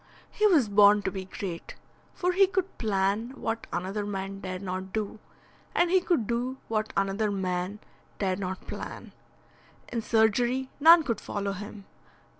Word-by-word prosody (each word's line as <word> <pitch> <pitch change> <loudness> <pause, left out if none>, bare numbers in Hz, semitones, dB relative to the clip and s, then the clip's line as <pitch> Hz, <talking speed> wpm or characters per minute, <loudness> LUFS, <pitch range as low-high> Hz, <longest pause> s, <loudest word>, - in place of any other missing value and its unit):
He 425 - +3
was 310 - +4
born 205 0 +6
to 190 - -1
be 190 0 -5
great, 185 -2 -6 0.4
for 360 0 +1
he 385 +2 +5
could 380 0 -2
plan 210 +3 0
what 225 0 -3
another 195 +4 -2
man 195 -1 -4
dare 185 -1 -4
not 185 0 -5
do, 215 0 -3 0.6
and 345 0 +3
he 375 0 +5
could 345 - +1
do 245 +4 -2
what 215 -1 -1
another 195 +2 +1
man 185 0 -2 0.4
dare 190 -2 0
not 190 -1 -5
plan. - - -7 0.8
In 235 -1 -2
surgery 240 +4 +2
none 325 +2 +8
could 235 -7 -2
follow 200 -1 -3
him. 205 +1 -8
210 Hz, 155 wpm, -28 LUFS, 195-245 Hz, 0.8 s, none